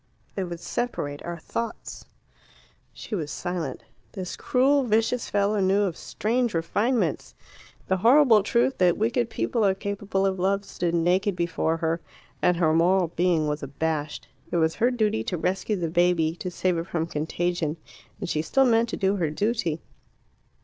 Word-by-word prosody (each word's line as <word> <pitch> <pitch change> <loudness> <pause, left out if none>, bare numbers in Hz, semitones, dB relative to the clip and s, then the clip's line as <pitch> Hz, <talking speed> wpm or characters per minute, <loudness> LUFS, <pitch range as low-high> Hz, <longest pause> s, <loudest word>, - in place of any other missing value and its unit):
"They 195 - -2
would 175 -2 -6
separate 170 -9 -3
our 175 0 -5
thoughts." 230 +7 -5 0.9
She - - -10
was 160 -7 -2
silent. 170 -4 -4 0.3
This 185 -3 -5
cruel, 275 +3 +2
vicious 230 +1 +1
fellow 205 +1 +1
knew 195 +2 +3
of 185 -5 -1
strange 235 +2 -1
refinements. 210 +9 0 0.5
The 190 - +1
horrible 235 +1 +6
truth, 235 +6 +1
that 180 -2 +4
wicked 235 +2 0
people 230 0 -1
are 195 -2 +3
capable 200 -1 -2
of 190 -1 0
love, 195 +2 +1
stood 170 -1 -2
naked 180 +4 +2
before 170 -2 0
her, 165 0 -1 0.4
and 180 -1 +3
her 160 -2 +3
moral 175 +2 +3
being 170 -2 +1
was 150 0 -2
abashed. 150 +2 -3 0.2
It - - -1
was 160 -1 +2
her 240 +7 +2
duty 215 - 0
to 180 - -2
rescue 190 +5 -1
the 175 -4 -2
baby, 170 -1 +2
to 180 - -4
save 180 -1 0
it 165 - -5
from 165 -3 -1
contagion, 165 +1 -2 0.4
and 195 - -4
she 155 -2 0
still 270 +12 +2
meant 230 -1 +3
to - - -3
do 195 0 +1
her 165 -5 0
duty. 175 -2 -1
185 Hz, 165 wpm, -25 LUFS, 165-215 Hz, 0.9 s, horrible